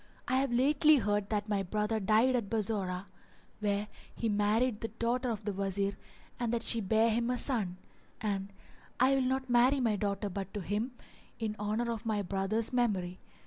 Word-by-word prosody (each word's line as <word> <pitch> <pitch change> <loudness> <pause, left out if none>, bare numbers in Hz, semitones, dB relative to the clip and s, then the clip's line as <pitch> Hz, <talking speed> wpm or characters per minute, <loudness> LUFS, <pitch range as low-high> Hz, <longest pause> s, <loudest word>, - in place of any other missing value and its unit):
I 260 - +2
have 270 -1 +1
lately 290 +5 +5
heard 205 -4 0
that 210 -1 -1
my 205 -2 0
brother 210 +3 -1
died 220 +6 +3
at 225 -5 -1
Bassorah, 200 -4 -1 0.5
where 205 0 0 0.3
he 230 - -1
had 205 - 0
married 215 +3 +1
the 225 - -2
daughter 235 +3 -1
of 215 -3 -4
the 205 - -1
Wazir 195 +1 -1 0.5
and 240 -2 -1
that 235 -1 -1
she 230 - +4
bare 220 +3 +3
him 235 +2 0
a 250 - 0
son; 210 -10 +1 0.4
and 200 -3 -2 0.5
I 260 +2 +5
will 270 - +2
not 260 +1 0
marry 250 +3 +4
my 230 -4 +2
daughter 200 +1 -1
but 195 +1 -6
to 205 - -2
him 210 +7 -2 0.4
in 220 -2 -3
honour 215 +3 -1
of 230 0 -5
my 210 -2 0
brother's 195 +5 -1
memory. 195 -7 0
220 Hz, 185 wpm, -31 LUFS, 200-240 Hz, 0.5 s, lately